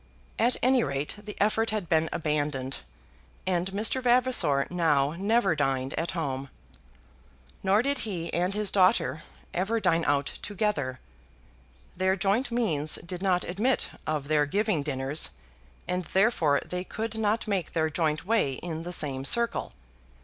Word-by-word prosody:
At 240 +2 +3
any 255 0 +4
rate 140 0 -2
the 210 -1 -8
effort 220 +2 +2
had 215 -5 -2
been 160 0 +2
abandoned, 145 -4 -2 0.7
and 180 0 0
Mr. 215 +6 +3
Vavasor 245 - +3
now 150 -5 +2
never 195 +1 +1
dined 135 -2 -1
at 165 +1 -2
home. 135 -4 -3 1.1
Nor 195 +4 +3
did 280 0 0
he 175 -6 -4
and 180 +3 0
his 210 -1 +1
daughter 160 -7 +3 0.3
ever 205 +6 0
dine 170 -5 +2
out 140 -1 +2 0.2
together. 190 - -2 1.0
Their 190 +1 +2
joint 200 +7 +1
means 165 -11 +1
did 180 +1 -6
not 185 -2 +2
admit 215 +9 0 0.2
of 150 -3 -2
their 150 -1 +2
giving 205 -1 +1
dinners, 140 +1 +1 0.6
and 180 0 -1
therefore 175 - +2
they 180 0 -4
could 220 +3 -5
not 220 +1 0
make 195 -6 -2
their 160 -1 +1
joint 155 0 0
way 215 -10 +1
in 160 +3 -5
the 175 +2 -6
same 135 -6 -2
circle. 235 +11 +2
180 Hz, 145 wpm, -27 LUFS, 150-210 Hz, 1.1 s, any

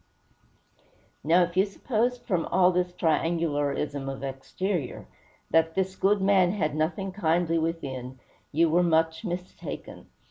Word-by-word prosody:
Now, 170 +5 +5
if 175 0 -4
you 190 - +5
supposed, 240 +4 -1
from 180 -6 -1
all 185 +1 +4
this 180 0 0
triangularism 150 -4 0
of 135 0 -8
exterior, 140 +4 -3 0.5
that 165 0 +3
this 190 0 -1
good 200 +1 +2
man 190 -2 +4
had 155 -8 -1
nothing 170 +5 -1
kindly 170 -3 +1
within, 130 -6 -4 0.3
you 165 +3 +3
were 170 +3 +3
much 160 0 +2
mistaken. 180 -2 -6
170 Hz, 130 wpm, -27 LUFS, 155-185 Hz, 0.5 s, Now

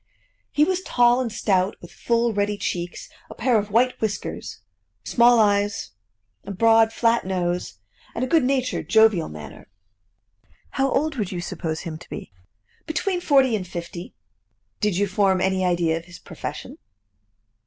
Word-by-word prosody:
"He 295 - +3
was 370 +3 +1
tall 245 -6 +3
and 240 -3 -3
stout, 195 -3 +1
with - - -13
full 235 -1 0
ruddy 205 0 0
cheeks, 175 -3 -4 0.2
a - - -10
pair 235 -1 +2
of 205 0 -5
white 245 +4 +1
whiskers, 215 -2 -4 0.4
small 240 0 +4
eyes, 205 -1 +1 0.5
a - - -10
broad 225 +3 +4
flat 230 0 +2
nose, 180 - -2 0.4
and 240 - -2
a - - 0
good 320 +1 +3
natured, 255 -1 -1
jovial 220 -6 +4
manner." 75 -2 -11 1.0
"How 270 -1 0
old 300 -1 0
would 205 -5 -2
you 180 - -4
suppose 165 -2 -4
him 160 -3 -6
to - - -15
be?" - - -8 0.6
"Between 355 +3 -1
forty 270 -7 +4
and 185 -4 -4
fifty." 170 +1 -7 0.6
"Did 210 -5 0
you 205 - +2
form 190 -1 +2
any 190 0 +1
idea 175 -2 +1
of 165 - -9
his 175 -1 -12
profession?" - - -8
210 Hz, 155 wpm, -23 LUFS, 180-240 Hz, 1.0 s, small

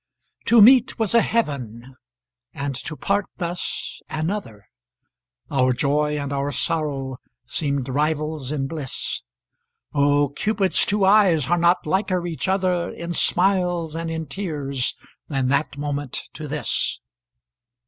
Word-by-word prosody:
To 230 -2 +7
meet 250 +1 +6
was 220 -2 +1
a 235 - +6
heaven 130 - -2 0.6
and 140 0 -3
to 155 +4 -5
part 200 +5 0
thus 175 -1 -4
another, 155 - -4 0.8
Our 130 -2 +3
joy 150 +3 +1
and 140 -1 -3
our 140 +1 -1
sorrow 140 -3 -2 0.3
seemed 140 0 -2
rivals 150 0 -1
in 140 -3 -1
bliss; 140 -3 -4 0.7
Oh! 145 0 +3
Cupid's 195 +5 +1
two 205 -1 +2
eyes 190 -8 +4
are 175 - +4
not 175 +2 +3
liker 185 +1 0
each 170 +2 -3
other 185 -2 +1
In 170 0 -5
smiles 175 -3 +2
and 165 0 -3
in 160 0 -3
tears 140 -6 -3 0.3
than 135 -3 0
that 140 +1 0
moment 145 -2 -3
to 155 - -6
this. 150 +1 -2
155 Hz, 130 wpm, -23 LUFS, 140-180 Hz, 0.8 s, To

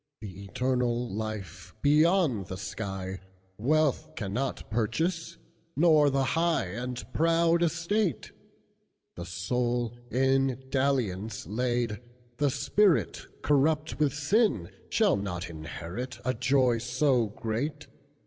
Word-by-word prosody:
"The 100 -2 -9
eternal 125 0 -1
life, 105 -5 -6
beyond 150 - +3
the 95 0 -5
sky, 95 -2 -5 0.4
Wealth 150 +4 +1
cannot 115 +6 -3
purchase, 165 - -1 0.4
nor 155 -2 +5
the 135 0 +1
highAnd 125 - -1
proud 165 +1 +3
estate; 170 - 0 0.8
The 85 0 -7
soul 120 +6 -1
in 135 +1 +1
dalliance 120 -7 0
laid, 120 -1 -1 0.4
the 145 +1 +2
spiritCorrupt 155 -2 +1
with 150 -2 +2
sin, 155 - +1 0.2
shall - - +3
not 90 -3 -3
inheritA 110 +11 -5
joy 125 -2 +3
so 125 0 +2
great. 120 +9 -3
125 Hz, 95 wpm, -28 LUFS, 110-150 Hz, 0.8 s, nor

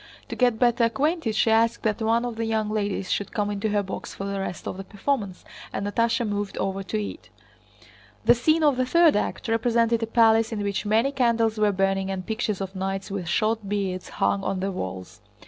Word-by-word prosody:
To - - -4
get 245 -3 +2
better 240 -1 +3
acquainted 275 0 0
she 220 - +3
asked 230 +1 +2
that 220 0 0
one 230 +2 +2
of 240 -2 -4
the 225 0 -2
young 220 -1 -1
ladies 205 -3 -2
should 205 - -1
come 205 -1 -1
into 205 +1 -2
her 205 -1 +1
box 190 - -7
for - - -6
the 200 0 -3
rest 195 -2 -5
of - - -4
the 195 - -6
performance, 200 -2 -3 0.3
and 200 - -3
Natásha 230 +3 +1
moved 205 -1 -3
over 195 0 -2
to 215 +3 -3
it. 210 +9 -6 1.0
The - - +7
scene 310 +7 +2
of 290 -4 +4
the 255 - +1
third 335 +2 +5
act 210 - -2
represented 230 0 +2
a 225 - -1
palace 225 0 +4
in 210 -2 -3
which 200 +1 -2
many 225 +6 +2
candles 230 -4 +1
were 210 -1 +3
burning 195 0 0
and 190 -1 -4
pictures 220 -3 -2
of 190 0 -5
knights 195 +1 -3
with 190 -3 -4
short 215 +3 0
beards 195 -3 -2
hung 200 -1 0
on 195 - -1
the 195 +1 -1
walls. 95 - -6
215 Hz, 215 wpm, -25 LUFS, 195-230 Hz, 1.0 s, The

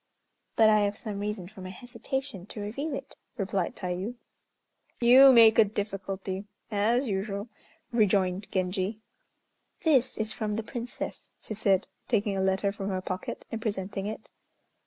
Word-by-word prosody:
"But 220 - +6
I 215 - +5
have 205 0 0
some 210 -3 -5
reason 205 -3 -3
for 195 0 -12
my 185 - -6
hesitation 240 -1 -5
to 210 - -8
reveal 275 +9 -3
it," 270 - -8 0.2
replied 195 -3 -1
Tayû. 185 +5 -3 0.8
"You 255 +3 +9
make 230 -3 +7
a - - +10
difficulty, 195 -2 -4 0.3
as 230 +6 +2
usual," 200 +1 -2 0.4
rejoined 195 -4 +2
Genji. 185 +2 -1 0.9
"This 265 -6 +3
is 220 0 -2
from 210 +1 -2
the 225 - -2
Princess," 240 +2 -6
she - - -7
said, 200 -2 +2 0.2
taking 205 -3 +1
a 190 - 0
letter 190 +1 +2
from 200 -1 -4
her 190 -1 -1
pocket 185 0 -5
and 225 - -4
presenting 200 -2 -3
it. 215 - -7
205 Hz, 150 wpm, -28 LUFS, 195-225 Hz, 0.9 s, a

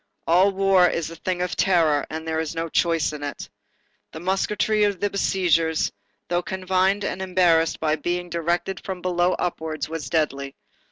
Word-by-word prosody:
All 185 +4 +4
war 190 -2 +4
is 165 -1 -3
a - - -8
thing 180 +2 -2
of 180 - -3
terror, 160 -6 +2
and 160 +1 -6
there 160 0 -1
is 160 0 -3
no 165 0 -3
choice 165 -1 +1
in 150 - -7
it. 145 -1 -5 0.7
The 160 - -7
musketry 205 +4 +1
of 200 -3 +1
the 205 +1 -1
besiegers, 170 -5 +1 0.4
though 175 0 0
confined 190 +2 0
and 190 - -3
embarrassed 175 -3 +2
by 155 0 +1
being 175 +3 -2
directed 170 +3 -2
from 185 -2 -6
below 180 0 +2
upwards, 160 -3 -3
was 165 -2 -5
deadly. 140 -4 -1
175 Hz, 170 wpm, -23 LUFS, 160-185 Hz, 0.7 s, All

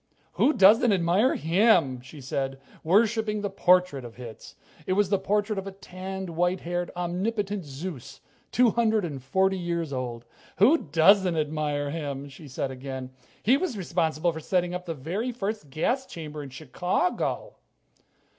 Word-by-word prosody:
"Who 300 - +3
doesn't 215 +3 +6
admire 190 +6 +3
him?" 165 - +3
she 130 +3 -12
said, 135 +1 -3 0.2
worshiping 215 +3 +2
the 205 - -3
portrait 180 -7 +3
of 120 -1 -10
Hitz. 120 -3 -10 0.3
It 185 - +2
was 200 0 +2
the 200 - +3
portrait 205 +1 0
of 195 - -7
a - - -5
tanned, 190 -1 -7
white 175 +3 0
haired, 175 +1 -2
omnipotent 195 +3 -2
Zeus, 140 -2 -7 0.3
two 245 -2 +4
hundred 220 -3 +2
and 145 -5 -6
forty 190 +8 +1
years 170 -4 -2
old. 120 -2 -4 0.3
"Who 270 - +6
doesn't 170 +3 +4
admire 150 -2 -1
him?" 145 -3 -4
she 145 +3 -12
said 135 0 -3
again. 130 0 -6 0.3
"He 250 +6 +5
was 300 - -2
responsible 170 -2 0
for 160 - -7
setting 180 +2 0
up 180 0 -5
the 165 - -3
very 185 - -3
first 210 - -4
gas 245 - -1
chamber 155 -2 -7
in 140 - -8
Chicago." 175 - -2
175 Hz, 155 wpm, -26 LUFS, 145-200 Hz, 0.3 s, doesn't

